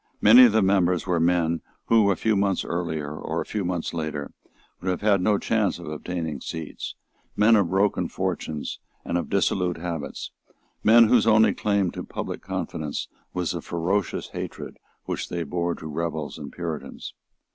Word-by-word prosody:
Many 120 Hz, +4 st, +9 dB
of 120 Hz, -, +5 dB
the 110 Hz, -1 st, +3 dB
members 90 Hz, -3 st, +2 dB
were 90 Hz, -2 st, +1 dB
men 85 Hz, -1 st, +2 dB, 0.2 s
who, 110 Hz, -3 st, +4 dB
a 100 Hz, -, +3 dB
few 110 Hz, +2 st, +1 dB
months 100 Hz, -1 st, +1 dB
earlier 80 Hz, -4 st, -3 dB
or -, -, -3 dB
a -, -, -3 dB
few 105 Hz, -2 st, -3 dB
months 90 Hz, -2 st, -2 dB
later, 80 Hz, -3 st, -4 dB, 0.5 s
would 95 Hz, -, -3 dB
have 90 Hz, -, -1 dB
had 100 Hz, -3 st, +3 dB
no 105 Hz, +2 st, +3 dB
chance 110 Hz, -1 st, 0 dB
of 85 Hz, -, -9 dB
obtaining 80 Hz, -1 st, -4 dB
seats, 80 Hz, -2 st, -6 dB, 0.4 s
men 110 Hz, +2 st, +5 dB
of 100 Hz, -5 st, +3 dB
broken 95 Hz, +1 st, +1 dB
fortunes 75 Hz, -2 st, -3 dB, 0.3 s
and -, -, -2 dB
of 85 Hz, -, -1 dB
dissolute 90 Hz, -3 st, +1 dB
habits, 80 Hz, -3 st, -5 dB, 0.5 s
men 115 Hz, +1 st, +7 dB
whose 115 Hz, -1 st, +4 dB
only 110 Hz, 0 st, +5 dB
claim 100 Hz, -4 st, +1 dB
to -, -, -6 dB
public -, -, -5 dB
confidence 75 Hz, -2 st, -4 dB, 0.3 s
was 90 Hz, -2 st, 0 dB
the 85 Hz, -, -4 dB
ferocious 90 Hz, +4 st, -1 dB
hatred -, -, -7 dB, 0.3 s
which -, -, -3 dB
they 85 Hz, -1 st, -2 dB
bore 85 Hz, +2 st, -1 dB
to -, -, -11 dB
rebels 80 Hz, -1 st, -3 dB
and 70 Hz, -, -7 dB
Puritans. 85 Hz, -3 st, -6 dB
90 Hz, 170 wpm, -25 LUFS, 80-100 Hz, 0.5 s, Many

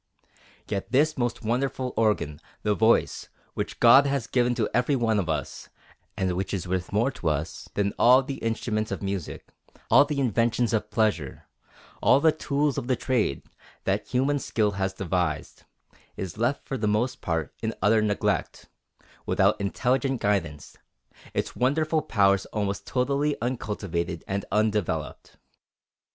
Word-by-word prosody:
Yet 100 Hz, +2 st, -4 dB
this 150 Hz, +4 st, +3 dB
most 120 Hz, -2 st, -2 dB
wonderful 125 Hz, +2 st, -1 dB
organ, 105 Hz, -9 st, 0 dB, 0.2 s
the 105 Hz, -, +2 dB
voice, 110 Hz, +2 st, +2 dB, 0.2 s
which -, -, -4 dB
God 135 Hz, +4 st, +7 dB
has 140 Hz, -4 st, -1 dB
given 120 Hz, 0 st, +1 dB
to 115 Hz, -3 st, 0 dB
every 125 Hz, +4 st, +2 dB
one 115 Hz, -4 st, +1 dB
of 90 Hz, -4 st, -2 dB
us, 80 Hz, -, -4 dB, 0.5 s
and 95 Hz, -1 st, 0 dB
which 95 Hz, +3 st, -2 dB
is 90 Hz, -, -4 dB
worth 90 Hz, -1 st, -2 dB
more 115 Hz, +7 st, +2 dB
to 90 Hz, -10 st, -2 dB
us 75 Hz, +1 st, -3 dB
than 100 Hz, -1 st, 0 dB
all 125 Hz, +3 st, +6 dB
the 135 Hz, +1 st, -5 dB
instruments 110 Hz, -1 st, -2 dB
of -, -, -4 dB
music, 95 Hz, -4 st, -5 dB, 0.4 s
all -, -, +8 dB
the 145 Hz, -1 st, -3 dB
inventions 120 Hz, -1 st, +1 dB
of 105 Hz, -1 st, 0 dB
pleasure, 105 Hz, -, -1 dB, 0.6 s
all 135 Hz, -, +5 dB
the 160 Hz, +2 st, +5 dB
tools 145 Hz, -2 st, -1 dB
of 120 Hz, -, -7 dB
trade, 115 Hz, -, 0 dB, 0.4 s
that -, -, -1 dB
human 140 Hz, +3 st, +1 dB
skill 110 Hz, -5 st, 0 dB
has 95 Hz, -1 st, -1 dB
devised, 90 Hz, -4 st, -2 dB, 0.5 s
is 95 Hz, -3 st, -5 dB
left 120 Hz, +6 st, -1 dB
for 135 Hz, -, -3 dB
the 105 Hz, -, 0 dB
most 110 Hz, +5 st, 0 dB
part 80 Hz, -3 st, -2 dB
in 110 Hz, -, -1 dB
utter 110 Hz, +3 st, +3 dB
neglect, 105 Hz, -1 st, -1 dB, 0.6 s
without 100 Hz, +2 st, +2 dB
intelligent 130 Hz, +6 st, 0 dB
guidance, 85 Hz, -8 st, -2 dB, 0.6 s
its -, -, -2 dB
wonderful 155 Hz, +5 st, +1 dB
powers 100 Hz, -5 st, +2 dB
almost 100 Hz, -2 st, -3 dB
totally 140 Hz, +3 st, 0 dB
uncultivated 100 Hz, -8 st, -3 dB
and 100 Hz, +1 st, -2 dB
undeveloped. 105 Hz, -7 st, -1 dB
110 Hz, 145 wpm, -26 LUFS, 100-130 Hz, 0.6 s, all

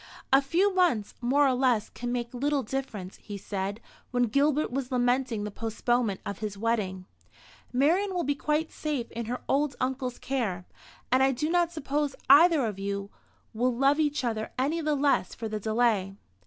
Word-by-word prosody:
"A 270 Hz, -, +7 dB
few 360 Hz, +9 st, +2 dB
months 345 Hz, -, +2 dB
more 275 Hz, +4 st, +3 dB
or 260 Hz, -, +3 dB
less 250 Hz, -4 st, +1 dB
can 240 Hz, 0 st, -5 dB
make 240 Hz, 0 st, -3 dB
little 280 Hz, +2 st, 0 dB
difference," 215 Hz, -7 st, -5 dB
he 205 Hz, -1 st, -8 dB
said, 200 Hz, +1 st, -4 dB, 0.3 s
when 245 Hz, -1 st, +1 dB
Gilbert 280 Hz, +5 st, +2 dB
was 260 Hz, 0 st, -3 dB
lamenting 245 Hz, -3 st, +1 dB
the 210 Hz, -, -4 dB
postponement 225 Hz, 0 st, -1 dB
of 200 Hz, -, -5 dB
his 210 Hz, -2 st, -4 dB
wedding. 200 Hz, -4 st, -1 dB, 0.7 s
"Marian 345 Hz, +10 st, +2 dB
will 350 Hz, -, 0 dB
be 285 Hz, -, +1 dB
quite 300 Hz, +3 st, -1 dB
safe 290 Hz, -6 st, -3 dB
in 235 Hz, 0 st, -4 dB
her 250 Hz, +2 st, -3 dB
old 280 Hz, -1 st, +1 dB
uncle's 255 Hz, -1 st, -2 dB
care; 215 Hz, -10 st, -2 dB, 0.5 s
and 255 Hz, +1 st, +4 dB
I 270 Hz, 0 st, +4 dB
do 300 Hz, +5 st, -2 dB
not 345 Hz, -1 st, +2 dB
suppose 290 Hz, -2 st, -2 dB, 0.2 s
either 310 Hz, -1 st, +7 dB
of 210 Hz, -3 st, -4 dB
you 200 Hz, 0 st, -3 dB, 0.4 s
will 245 Hz, +2 st, +1 dB
love 275 Hz, +4 st, +3 dB
each 295 Hz, -2 st, +1 dB
other 220 Hz, -3 st, -2 dB
any 295 Hz, +6 st, 0 dB
the 305 Hz, -1 st, +1 dB
less 280 Hz, -9 st, +1 dB
for 225 Hz, -, -5 dB
the 215 Hz, 0 st, -3 dB
delay. 215 Hz, -3 st, +1 dB
250 Hz, 180 wpm, -28 LUFS, 220-285 Hz, 0.7 s, A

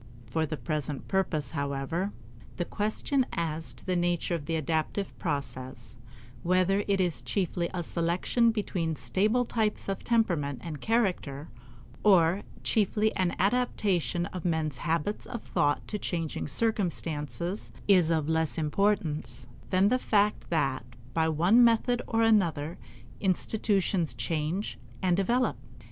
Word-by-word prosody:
For 160 Hz, +8 st, -1 dB
the 155 Hz, +1 st, -4 dB
present 150 Hz, -3 st, -3 dB
purpose, 160 Hz, -8 st, 0 dB
however, 140 Hz, +6 st, -2 dB, 0.5 s
the 175 Hz, -, -1 dB
question 215 Hz, +8 st, 0 dB
as 160 Hz, -2 st, -2 dB
to -, -, -17 dB
the 185 Hz, -, 0 dB
nature 175 Hz, 0 st, 0 dB
of 155 Hz, -4 st, -3 dB
the 165 Hz, -, 0 dB
adaptive 160 Hz, +5 st, -1 dB
process 130 Hz, -, -4 dB, 0.5 s
whether 185 Hz, +3 st, +2 dB
it 200 Hz, -1 st, +2 dB
is 175 Hz, -4 st, +1 dB
chiefly 180 Hz, -3 st, -1 dB
a 180 Hz, -2 st, -3 dB
selection 175 Hz, +8 st, +1 dB
between 180 Hz, -7 st, -1 dB
stable 215 Hz, +10 st, +1 dB
types 220 Hz, -2 st, -1 dB
of 195 Hz, -1 st, -3 dB
temperament 170 Hz, -, +1 dB
and 155 Hz, -5 st, -6 dB
character, 180 Hz, -10 st, 0 dB, 0.5 s
or 185 Hz, -2 st, +5 dB, 0.2 s
chiefly 215 Hz, 0 st, +2 dB
an 185 Hz, -2 st, +1 dB
adaptation 195 Hz, -5 st, +1 dB
of 180 Hz, -3 st, -5 dB
men's 160 Hz, -5 st, 0 dB
habits 165 Hz, +7 st, -1 dB
of 235 Hz, -3 st, -6 dB
thought 145 Hz, 0 st, 0 dB
to 210 Hz, -, -3 dB
changing 165 Hz, -6 st, -3 dB
circumstances 175 Hz, -2 st, -2 dB, 0.2 s
is 180 Hz, -5 st, +5 dB
of 160 Hz, -3 st, +1 dB
less 160 Hz, -1 st, +1 dB
importance 160 Hz, -1 st, 0 dB, 0.2 s
than 190 Hz, +2 st, +4 dB
the 255 Hz, -, +2 dB
fact 210 Hz, -3 st, +1 dB
that, 135 Hz, -7 st, +1 dB, 0.3 s
by 160 Hz, -1 st, +2 dB
one 175 Hz, +10 st, +5 dB
method 235 Hz, +1 st, +3 dB
or 225 Hz, -1 st, +2 dB
another, 170 Hz, -8 st, +2 dB, 0.4 s
institutions 190 Hz, -, +1 dB
change 150 Hz, -, -2 dB, 0.2 s
and 180 Hz, -2 st, +3 dB
develop. 240 Hz, +7 st, +1 dB
175 Hz, 130 wpm, -29 LUFS, 155-205 Hz, 0.5 s, or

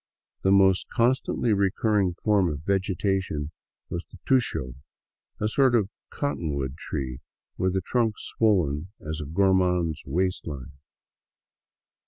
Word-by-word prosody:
The 95 Hz, -, +3 dB
most 95 Hz, -1 st, +4 dB
constantly 120 Hz, -1 st, +1 dB
recurring 100 Hz, -1 st, +1 dB
form 100 Hz, -5 st, +3 dB
of 75 Hz, -1 st, -5 dB
vegetation 95 Hz, -5 st, 0 dB, 0.4 s
was 85 Hz, 0 st, -4 dB
the -, -, -16 dB
tusho, 120 Hz, -, +1 dB, 0.7 s
a 105 Hz, -, +1 dB
sort 130 Hz, +2 st, +3 dB
of 105 Hz, -4 st, +2 dB, 0.2 s
cottonwood 75 Hz, -, -2 dB
tree 65 Hz, -5 st, -4 dB, 0.4 s
with 95 Hz, 0 st, 0 dB
a 95 Hz, -, +1 dB
trunk 115 Hz, +2 st, +1 dB
swollen 90 Hz, -8 st, +1 dB
as 80 Hz, +1 st, -5 dB
a 75 Hz, -, -5 dB
gormand's 90 Hz, -2 st, +2 dB
waist 90 Hz, +6 st, -1 dB
line. 70 Hz, -3 st, -6 dB
95 Hz, 120 wpm, -26 LUFS, 75-105 Hz, 0.7 s, most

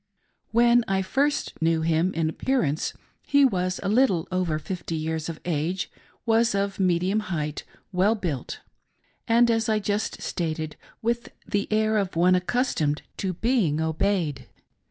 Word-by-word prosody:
When 235 Hz, +1 st, +4 dB
I 190 Hz, 0 st, +1 dB
first 280 Hz, -, 0 dB
knew 160 Hz, 0 st, +2 dB
him 165 Hz, +3 st, +2 dB
in 165 Hz, -1 st, +1 dB
appearance 160 Hz, -, 0 dB, 0.3 s
he 285 Hz, -1 st, +4 dB
was 185 Hz, -6 st, 0 dB
little 200 Hz, -4 st, +2 dB
over 180 Hz, -4 st, 0 dB
fifty 170 Hz, +1 st, -5 dB
years 160 Hz, 0 st, -2 dB
of 165 Hz, -, -6 dB
age, 175 Hz, +3 st, -1 dB, 0.3 s
was 230 Hz, -1 st, +3 dB
of 200 Hz, 0 st, -1 dB
medium 185 Hz, +2 st, +2 dB
height, 155 Hz, -8 st, -3 dB, 0.3 s
well 195 Hz, +4 st, +3 dB
built, 165 Hz, -, -4 dB, 0.7 s
upright, 230 Hz, -, +3 dB
and, 240 Hz, 0 st, +5 dB
as 225 Hz, -1 st, +1 dB
I 215 Hz, -, +3 dB
just 210 Hz, +1 st, -2 dB
stated> 160 Hz, -2 st, -3 dB, 0.3 s
with 235 Hz, +1 st, -1 dB, 0.2 s
the 205 Hz, +1 st, -1 dB
air 215 Hz, 0 st, +2 dB
of 195 Hz, -4 st, -2 dB
one 180 Hz, +2 st, +4 dB
accustomed 180 Hz, -, 0 dB
to 190 Hz, -2 st, -2 dB
be 205 Hz, -, +1 dB
obeyed. 160 Hz, -1 st, 0 dB
185 Hz, 145 wpm, -25 LUFS, 160-220 Hz, 0.7 s, and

